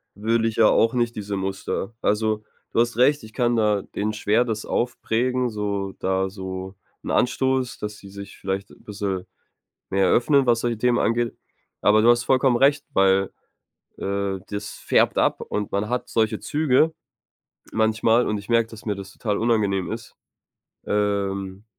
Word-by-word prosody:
will 115 +3 +1
ich 115 -1 -1
ja 110 -2 +6
auch 115 - +3
nicht 120 -1 0
diese 100 -1 -4
Muster. 95 +2 -3
Also, 105 0 0 0.3
du - - 0
hast 120 0 +1
recht, 140 +3 +4
ich 110 0 -12
kann 120 -1 +1
da 105 -3 +2
denen 105 +2 -3
schwer 105 +3 +2
das 110 -2 -3
aufprägen, 125 +1 0
so 100 -3 -3
da 95 0 0
so 95 0 -6 0.3
'n - - -4
Anstoß, 130 0 +1
dass 105 -1 -5
sie 100 - -13
sich 100 0 -10
vielleicht 95 0 -3 0.2
bisschen 100 -3 -3 0.7
mehr 95 0 +2
öffnen, 140 +2 +3
was 120 -1 +3
solche 120 -2 -1
Themen 120 +1 +2
angeht. 115 0 0 0.4
Aber 105 +1 +4
du 115 - +6
hast 120 0 +3
vollkommen 130 0 +3
recht, 140 +3 +3
weil, 95 -3 +3 0.7
äh, 100 -1 -2
das 105 +1 -5
färbt - - +2
ab - - +2
und 105 -1 -3
man 100 +2 -1
hat 125 - -2
solche 110 -2 +1
Züge 155 +1 +2 0.8
manchmal 110 +2 +2
und 105 - -1
ich 100 - -11
merke, 115 -1 +3
dass 110 -1 -12
mir 105 - 0
das 95 0 -9
total 105 -3 -2
unangenehm 105 -5 +1
ist. - - -8 0.7
Ähm. 100 -1 -1
110 Hz, 165 wpm, -23 LUFS, 100-120 Hz, 0.8 s, ja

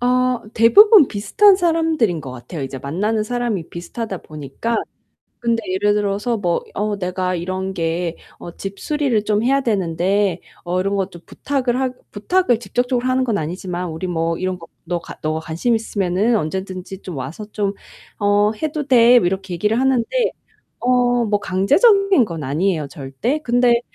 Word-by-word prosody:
어 250 0 +1
대부분 395 - +7
비슷한 230 - +4
사람들인 320 - +1
것 135 - -8
같아요 135 +5 -7
이제 135 0 -5
만나는 205 - -1
사람이 225 -6 -2
비슷하다 190 +3 -5
보니까. 155 - -4 0.7
근데 230 -1 +2
예를 205 +2 +2
들어서 205 +3 0
뭐 175 -4 0
"어 210 0 -1
내가 185 0 -2
이런 185 +2 -3
게 170 0 -2 0.2
어 170 - -9
집 195 0 -6
수리를 280 -8 0
좀 210 0 +1
해야 275 +3 +2
되는데 190 -2 0 0.2
어 180 +1 -1
이런 195 +2 -1
것 195 0 -1
좀 170 - -12
부탁을 260 -3 -2
하" 260 -1 0 0.2
부탁을 245 - +1
직접적으로 245 +1 -1
하는 255 0 +2
건 225 -5 0
아니지만 180 +2 -4
"우리 160 +4 -5
뭐 165 -1 -1
이런 185 0 -2
거 165 - -12 0.2
너 175 +1 -2
가 - - -10
네가 155 +1 -1
관심 165 +10 -1
있으면 210 0 0
언제든지 190 +1 -4
좀 180 -5 -7
와서 140 +10 -6
좀 200 -2 -1 0.5
어 205 +1 +3
해도 305 -2 -2
돼." 245 -2 +6
뭐 175 - +1
이렇게 190 0 -2
얘기를 210 +7 +1
하는데 260 -3 +2 0.7
어 245 -1 +2
뭐 205 -1 +1
강제적인 290 - +4
건 165 -6 -6
아니에요 155 +2 0
절대. 140 - -3
근데 240 0 +3
205 Hz, 330 characters per minute, -20 LUFS, 175-245 Hz, 0.7 s, 대부분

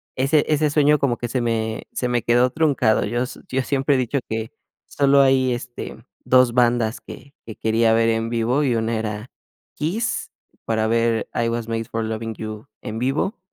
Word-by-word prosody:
ese 140 +3 +3
ese 150 0 +2
sueño 150 0 +3
como 125 -4 +1
que 120 - -4
se 125 +2 -1
me 110 -2 -2
se 125 - -2
me 120 -1 0
quedó 120 +2 +3
truncado. 140 -7 +2
Yo 120 +4 -1 0.3
yo 130 0 0
siempre 135 +1 +1
he - - +2
dicho 130 +2 0
que 110 +2 -3 0.3
solo 140 0 +3
hay, 130 -1 +3
este, 120 0 -7 0.3
2 125 -2 +4
bandas 120 -2 +2
que 140 0 -12
que 110 - -7
quería 110 0 +2
ver 115 0 +3
en 115 0 0
vivo, 120 +5 +1
y 130 -4 +1
una 115 0 0
era 110 +1 -5 0.4
Kiss, 220 +10 -2 0.3
para 110 -1 0
ver: 115 0 +1
"I 115 -1 0
Was 115 -1 -3
Made 115 0 -2
for 115 0 -3
Lovin' 110 0 -4
You" 110 -1 -7 0.2
en 110 +1 -5
vivo, 135 - -1
120 Hz, 185 wpm, -22 LUFS, 115-135 Hz, 0.4 s, 2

